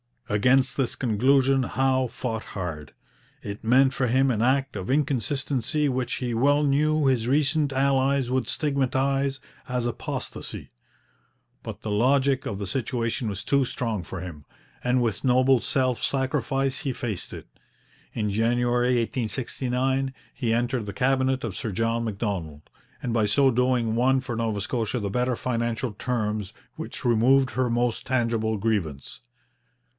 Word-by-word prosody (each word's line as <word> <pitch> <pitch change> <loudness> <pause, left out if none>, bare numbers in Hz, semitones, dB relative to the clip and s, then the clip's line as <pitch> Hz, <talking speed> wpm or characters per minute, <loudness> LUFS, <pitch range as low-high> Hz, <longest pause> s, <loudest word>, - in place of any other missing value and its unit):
Against 125 +6 +3
this 130 -4 +1
conclusion 135 +3 +3
Howe 130 +1 +1
fought 115 -2 -5
hard. 80 -7 -5 0.5
It 100 +2 -7
meant 130 +3 +5
for 130 - 0
him 130 +2 +3
an 110 -3 -1
act 135 +2 +1
of 95 - -5
inconsistency 140 0 0
which 130 -1 -1
he 125 -2 -3
well 145 +5 +3
knew 150 +2 +2
his 125 -4 +2
recent 145 +1 +2
allies 135 -1 +2
would 130 0 0
stigmatize 135 -1 0 0.3
as 125 -1 -1
apostasy. 120 - -5 0.9
But - - -8
the 110 - -4
logic 130 +5 +2
of 100 - -3
the 100 - -4
situation 115 +1 -2
was 100 -1 -4
too 140 -1 +2
strong 115 -5 -3
for 90 +2 -7
him, 80 -6 -8 0.4
and 125 0 +2
with 115 +3 -2
noble 130 0 +4
self 130 0 0
sacrifice 135 0 0
he 135 -4 -2
faced 110 -6 -5
it. - - -8 0.7
In 105 -2 -1
January 120 +3 +2
1869 130 +3 -1 0.2
he 115 -3 -1
entered 120 0 0
the 100 - -6
Cabinet 130 +1 +1
of 110 -6 -4
Sir 110 - -3
John 115 +3 0
Macdonald, 95 -9 -3 0.4
and 120 - -1
by 110 -2 +2
so 135 +6 +4
doing 125 -2 +1
won 130 +3 +3
for 120 -3 -5
Nova 110 -3 -1
Scotia 115 +2 -2
the 100 -3 -3
better 125 +2 0
financial 120 0 -2
terms 105 -2 -2 0.2
which - - -7
removed 130 +3 +4
her 130 -1 0
most 120 0 0
tangible 115 -4 0
grievance. 90 - -2
125 Hz, 145 wpm, -25 LUFS, 115-135 Hz, 0.9 s, meant